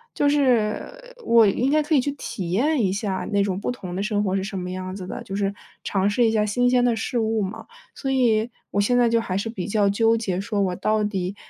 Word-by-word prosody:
就 290 - +2
是， 285 - 0
我 230 -1 +6
应 250 +7 +1
该 305 0 +3
可 300 +1 0
以 265 - +4
去 285 - -2
体 185 -10 -5
验 275 +7 +2
一 190 - +1
下 195 -2 -2
那 200 0 +2
种 190 -2 -1
不 245 - -2
同 185 -7 -7
的 195 - -2
生 210 -1 0
活 190 -1 0
是 190 - -1
什 195 -1 -4
么 180 - -5
样 185 0 -5
子 185 -2 -7
的， - - -6
就 195 - -8
是 200 0 -1 0.3
尝 195 0 +1
试 235 +3 +2
一 - - +2
下 215 -1 +2
新 245 +4 +1
鲜 250 -1 +3
的 245 -1 +3
事 240 - -3
物 220 -1 0
嘛。 205 +4 -5 0.3
所 270 - -3
以， 235 -3 +2 0.2
我 205 - +1
现 245 +4 +2
在 245 -1 +4
就 230 0 +2
还 185 -3 -3
是 225 +3 -2
比 200 -4 -5
较 205 -1 +2
纠 225 +3 +3
结 190 -5 -2
说， 205 0 -2
我 185 -2 0
到 215 +3 0
底 195 -2 -2
215 Hz, 275 characters per minute, -23 LUFS, 195-245 Hz, 0.3 s, 我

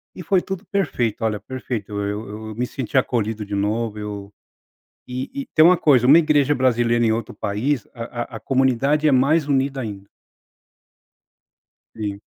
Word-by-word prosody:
E - - -7
foi 180 +3 +2
tudo 190 +1 -6
perfeito, 125 - -1
olha, 105 -2 0
perfeito, 120 -3 -5
eu 100 +2 -3 0.2
eu - - -7
me 125 +3 -2
senti 130 +1 -5
acolhido 110 -4 0
de 100 0 -6
novo, 105 +2 -1
eu 100 -1 -7 0.7
E 130 - -5
e - - -12
tem 155 - +7
uma 180 +2 +7
coisa, 135 -7 +4
uma 145 +5 +8
igreja 145 -3 +3
brasileira 120 -2 +2
em 110 - +3
outro 115 -1 -4
país, 115 +6 -2
a 120 0 -6
a - - -4
a - - -8
comunidade 135 +3 +1
é - - +3
mais 140 +4 +3
unida 135 -1 0
ainda. 100 -4 -7 1.9
Sim. 100 -2 -4
120 Hz, 165 wpm, -21 LUFS, 110-140 Hz, 1.9 s, uma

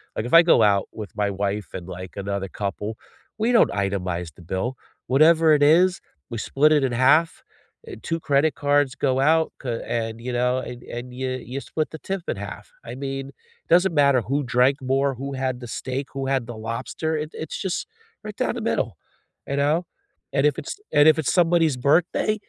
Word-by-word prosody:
like, 110 - -2
if 120 - -6
I 165 - +10
go 170 - +5
out 100 -2 +3
with 105 -2 -7
my 105 -1 +1
wife 100 +1 -3
and, 90 - -6
like, 90 0 -8
another 100 0 -3
couple, 105 +3 -4 0.4
we 225 +3 +2
don't 235 - +5
itemize 90 -4 -2
the - - -15
bill. 95 +9 -3 0.3
Whatever 160 +4 +5
it 145 -1 +3
is, 180 +5 +4 0.3
we 115 - -5
split 150 +7 +2
it 150 -2 +3
in 130 -2 0
half, 145 +7 +3 0.4
eh, 415 - -7
2 165 0 -2
credit 145 +1 +2
cards 145 -2 +2
go 130 -2 0
out 160 +3 +3
c - - -6 0.3
and, 115 -1 -4
you 125 - -2
know, 125 +1 +1
and 125 - -8 0.2
and 125 +1 -7
you 130 0 -1 0.2
you 135 - -3
split 155 +2 -3
the 160 - -8
tip 195 -2 -2
in - - -2
half. - - -9 0.2
I - - -5
mean, 135 0 -3
it 470 0 -34
doesn't 180 0 +4
matter 140 -3 +4
who 135 +5 -1 0.2
drank 130 +3 +4 0.2
more, 135 +1 +2
who 140 +1 -4
had 130 -1 0
the 120 - -7
steak, 130 +2 -4
who 135 0 -3
had 135 -2 +1
the 120 -2 -7
lobster, 130 +7 -3
it 155 +1 -6
it's 160 - -6
just 185 - -1 0.5
right - - -6
down - - 0
the - - -4
middle, - - -1 0.6
you 140 - -1
know, 150 +3 +3 0.6
and 135 - +3
if 145 - -7
it's 395 - -7 0.2
and 145 - +7
if - - -5
it's 150 - 0
somebody's 165 -5 +3
birthday, 175 +7 +2
135 Hz, 205 wpm, -23 LUFS, 115-160 Hz, 0.6 s, I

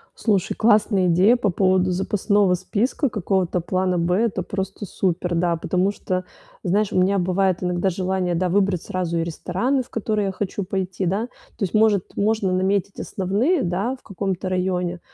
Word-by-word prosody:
Слушай, 200 -5 0
классная 210 -4 +3
идея 185 +8 +5
по 215 -5 0
поводу 185 0 +2
запасного 195 +1 +2
списка, 230 - -1
какого-то 185 -3 0
плана 185 0 0
"Б". 170 +1 +1
Это 200 -3 0
просто 195 +2 -4
супер. 180 -1 -1
Да, 170 0 +1
потому 180 +4 0
что, 185 -2 -3 0.4
знаешь, 200 +3 +1
у - - +1
меня 195 +2 +2
бывает 185 0 +1
иногда 180 +1 0
желание, 185 -1 -1
да, 180 +1 0
выбрать 195 -2 +1
сразу 175 -2 -2
и 165 - +1
рестораны, 190 - -1
в - - -22
которые 215 -2 -1
я 195 - -1
хочу 200 +1 -3
пойти, 190 0 -3
да. 200 +7 0 0.3
То - - -3
есть, 190 - -2
может, 215 -3 +3
можно 210 -2 +1
наметить 190 +1 0
основные, 220 - 0
да, 195 +9 -1
в - - -22
каком-то 190 -2 -3
районе, 180 -1 -1
190 Hz, 170 wpm, -22 LUFS, 180-205 Hz, 0.4 s, идея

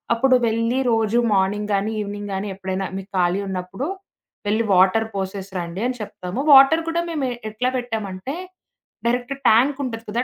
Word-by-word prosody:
అప్పుడు 255 +2 +4
వెళ్ళి 230 +3 0
రోజు 225 0 +2 0.2
మార్నింగ్ 205 +2 +1
గానీ, 200 +3 0
ఈవినింగ్ 205 0 -5
గానీ 200 +2 -3
ఎప్పుడైనా 190 0 -3
మీకు 195 +1 -9
ఖాళీ 180 +2 +2
ఉన్నప్పుడు 190 +8 -4 0.6
వెళ్లి 215 +2 +2
వాటర్ 190 +5 +4
పోసేసిరాండి 190 -1 -4
అని 255 0 -3
చెప్తాము. 185 +1 -6
వాటర్ 275 +5 +7
కూడా 340 +1 0
మేము 295 -5 -1 0.2
ఎట్లా 250 +4 -1
పెట్టామంటే, 225 0 -4 0.7
డైరెక్ట్ 245 +2 0 0.2
ట్యాంకుంటది 245 -1 +2
కదా! 235 +3 0
215 Hz, 140 wpm, -22 LUFS, 190-245 Hz, 0.7 s, వాటర్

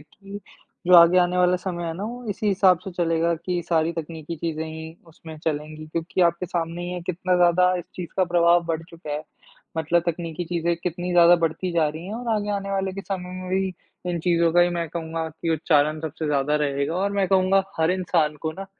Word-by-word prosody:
कि 195 +6 -11 0.5
जो 180 - +6
आगे 170 +2 +7
आने 180 0 +2
वाला 180 0 +4
समय 180 -2 -4
है 165 - -2
ना, 195 - -4
वो 245 +3 -6
इसी 205 +2 -3
हिसाब 190 -2 +4
से 190 - -5
चलेगा 170 -1 +1
कि 175 +2 -3
सारी 165 -1 +2
तकनीकी 165 0 -6
चीज़ें 160 0 -3
ही 160 +1 -8
उसमें 160 -1 -11
चलेंगी 155 0 -3
क्योंकि 165 +3 -3
आपके 170 +1 +1
सामने 170 0 -3
ही 175 - -4
है 180 0 -4
कितना 185 +1 0
ज़्यादा 180 +1 +4
इस 175 - -6
चीज़ 180 -2 -6
का 185 - +3
प्रभाव 170 0 +3
बढ़ 165 -1 -2
चुका 165 -2 -9
है। 150 - -3 0.6
मतलब 165 +2 +2
तकनीकी 170 0 -3
चीज़ें 170 0 0
कितनी 175 +1 -3
ज़्यादा 175 0 +7
बढ़ती 165 +2 -1
जा 165 -3 +2
रही 160 +3 -7
हैं, 205 - -5
और 240 +1 -5
आगे 210 0 -2
आने 195 0 -5
वाले 195 -1 -1
के 195 - -5
समय 185 -2 -5
में 185 - -7
भी 190 0 0 0.4
इन 175 - -1
चीज़ों 170 -1 +2
का 175 - +5
ही 175 - +5
मैं 170 -1 -2
कहूँगा 160 0 -4
कि 160 +1 -4
उच्चारण 155 -1 +2
सबसे 160 0 -4
ज़्यादा 145 0 +1
रहेगा 140 +1 -1
और 195 +2 0
मैं 200 -1 +1
कहूँगा 190 0 +3 0.2
हर 160 +1 +3
इंसान 165 -4 +1
को 160 -1 -2
ना 195 +3 -8
170 Hz, 220 wpm, -24 LUFS, 160-180 Hz, 0.6 s, आगे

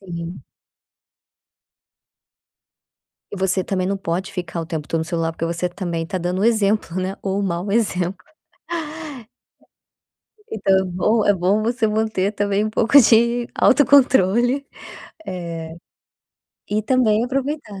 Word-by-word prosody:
Sim. 170 -2 -7 2.9
E - - -6
você 190 0 0
também 185 -2 -1
não 200 +1 -1
pode 185 0 -3
ficar 175 -2 -4
o 165 - -6
tempo 160 -3 -5
todo 165 - 0
no - - -2
celular, 165 0 -1
porque 165 +1 -3
você 170 +1 -2
também 175 -2 -4
está 185 +3 -4
dando 180 +2 -2
exemplo, 210 -5 +1
né, 190 +1 -3
ou 195 0 -1
o - - -1
mau 185 +1 -2
exemplo. 185 -4 -1 2.3
Então 195 -3 +2
é 190 - -2
bom 210 +5 +1
é 205 - +5
bom 190 +4 +1
você 230 0 0
manter 215 -2 0
também 205 0 0
um 215 - -2
pouco 235 +6 +5
de 235 0 +3
autocontrole, 260 -2 +4 0.6
eh, 165 -3 -6 1.0
e 215 +1 0
também 225 -1 +2
aproveitar, 270 -5 -3
195 Hz, 130 wpm, -21 LUFS, 175-220 Hz, 2.9 s, é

